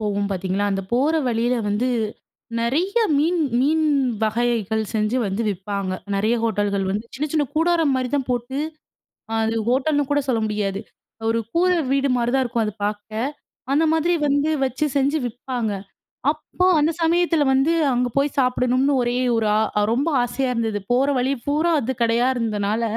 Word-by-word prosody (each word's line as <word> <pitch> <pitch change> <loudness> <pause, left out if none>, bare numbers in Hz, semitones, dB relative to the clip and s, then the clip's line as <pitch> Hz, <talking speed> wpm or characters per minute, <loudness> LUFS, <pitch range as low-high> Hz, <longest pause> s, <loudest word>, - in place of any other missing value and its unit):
போவோம் 205 -1 -1
பார்த்தீங்களா, 190 +1 -1
அந்த 195 0 -2
போற 285 +6 +2
வழியில 240 +2 +1
வந்து 210 +5 0 0.7
நெறைய 310 - 0 0.2
மீன் 335 +4 +1 0.2
மீன் 315 +3 +2 0.4
வகைகள் 220 -1 0
செஞ்சு 215 +3 +1
வந்து 195 +4 -2
விப்பாங்க. 195 0 -3 0.2
நெறைய 215 +4 +1
ஹோட்டல்கள் 205 -3 0
வந்து 205 +3 -2
சின்ன 295 +3 -2
சின்ன 305 -2 +2
கூடாரம் 325 -2 +2
மாரி 255 -1 -1
தான் 270 -3 -1
போட்டு, 245 +2 -2 0.8
அது 225 0 0
ஹோட்டல்னு 280 +3 +1
கூட 290 - +3
சொல்ல 230 -3 +1
முடியாது. 205 -2 -2 0.5
ஒரு 230 0 +1
கூர 360 +2 +3 0.2
வீடு 275 0 +2
மாரி 240 0 0
தான் 265 - +3
இருக்கும் 235 -2 -1
அது 210 - -2
பார்க்க, 215 +5 -3 0.4
அந்த 305 +3 +3
மாதிரி 320 +2 +2
வந்து 285 +2 +2 0.2
வச்சு 260 +3 -2
செஞ்சு 280 +3 +1
விப்பாங்க. 245 -2 -3 0.6
அப்ப 365 - -2
அந்த 300 +2 +2
சமயத்தில 335 -1 +2
வந்து 270 +4 +3 0.2
அங்க 245 0 +1
போய் 280 +1 +1
சாப்பிடணும்ன்னு 255 +1 +2
ஒரே 240 0 0 0.2
ஒரு 225 -1 +1
ஆ - - +4 0.2
அ - - +3
ரொம்ப 270 +6 0 0.2
ஆசையா 255 +2 -1
இருந்தது. 225 -3 -1
போற 255 +3 +3
வழி 255 +2 +1
பூரா 310 +4 +2
அது 260 0 -2
கடையா 235 +2 +3
இருந்தனால, 215 -1 -1
245 Hz, 160 wpm, -22 LUFS, 220-285 Hz, 0.8 s, ஆ